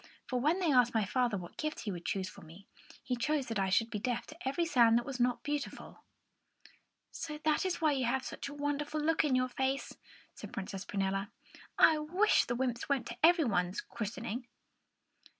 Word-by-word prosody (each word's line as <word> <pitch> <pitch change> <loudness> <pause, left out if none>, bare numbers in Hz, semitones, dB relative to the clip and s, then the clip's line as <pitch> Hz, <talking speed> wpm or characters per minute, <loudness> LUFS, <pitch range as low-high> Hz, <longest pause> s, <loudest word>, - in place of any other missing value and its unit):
"For 250 - -1
when 305 +8 +2
they 345 -5 +2
asked 245 -3 +4
my 220 -2 +3
father 240 +1 +1
what 175 -2 -9
gift 305 0 -3
he 210 - -3
would 175 -2 -6
choose 190 -1 -1
for 185 - -11
me, 165 +5 -14 0.4
he 250 - -1
chose 275 +3 0
that 225 -4 -2
I 190 -1 +1
should 225 +4 +2
be 210 - -2
deaf 240 +2 -2
to 315 -2 -9
every 335 +6 +1
sound 240 -7 +5
that 240 - -1
was 270 -2 -5
not 245 0 +1
beautiful." 290 -1 -4 1.1
"So 300 -2 -5
that 310 +4 +1
is 355 -2 -2
why 310 -2 +4
you 265 -3 0
have 260 +2 0
such - - -5
a - - -8
wonderful 290 +1 -2
look 320 +2 +2
on 285 -4 +2
your 255 0 +1
face," 265 +2 -2 0.4
said - - -10
Princess 195 0 -5
Prunella. 195 0 -1 0.5
"I 315 -1 +6
wish 360 +8 +3
the 240 - -2
wymps 245 0 -2
went 270 -4 +1
to 235 - -7
everybody's 235 - +3
christening!" 235 +2 -5
255 Hz, 200 wpm, -32 LUFS, 225-300 Hz, 1.1 s, I